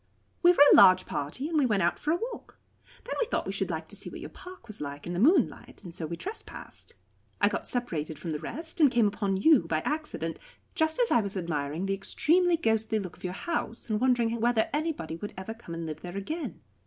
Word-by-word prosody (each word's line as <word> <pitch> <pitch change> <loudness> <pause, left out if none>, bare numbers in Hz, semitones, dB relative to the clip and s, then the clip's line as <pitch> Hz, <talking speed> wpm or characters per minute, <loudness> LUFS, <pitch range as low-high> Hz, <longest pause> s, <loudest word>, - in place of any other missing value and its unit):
"We 350 - +7
were 315 -5 +7
a - - +9
large 185 0 +7
party, 150 - -3
and 320 -1 +1
we 270 - +3
went 205 -5 +2
out 170 - +1
for 300 - -3
a - - +3
walk. 470 +6 -7 0.5
Then - - -5
we - - +1
thought - - -1
we - - -3
should - - -1
like - - -4
to - - -6
see - - -6
what - - -9
your - - -8
park 365 -8 -12
was 215 -7 -9
like 145 0 -6
in 175 - -4
the 175 - -2
moonlight, 295 - +2
and 175 -3 -9
so 165 -2 -4
we 170 +1 -5
trespassed. 420 +4 -7 0.4
I - - +5
got - - -3
separated 160 - -2
from 160 +2 -5
the 150 - -2
rest, 320 - -5
and 295 - +7
came 240 -3 +3
upon 200 -1 0
you 220 - +5
by 155 -1 0
accident, 300 - -3 0.3
just 315 +1 0
as 480 -2 +3
I 235 - +5
was 200 -1 -3
admiring 160 -1 -2
the 195 - 0
extremely 340 - +2
ghostly 220 -5 +1
look 185 -5 -5
of - - -20
your 180 -1 -3
house, 235 - -3
and 215 +1 0
wondering 235 -3 +2
whether 240 +5 +2
anybody 295 - -2
would 205 +5 -7
ever 190 +4 -5
come 225 -7 -9
and 165 0 -4
live 155 -1 -6
there 180 +2 -6
again. 310 - -5
220 Hz, 240 wpm, -28 LUFS, -, 0.5 s, a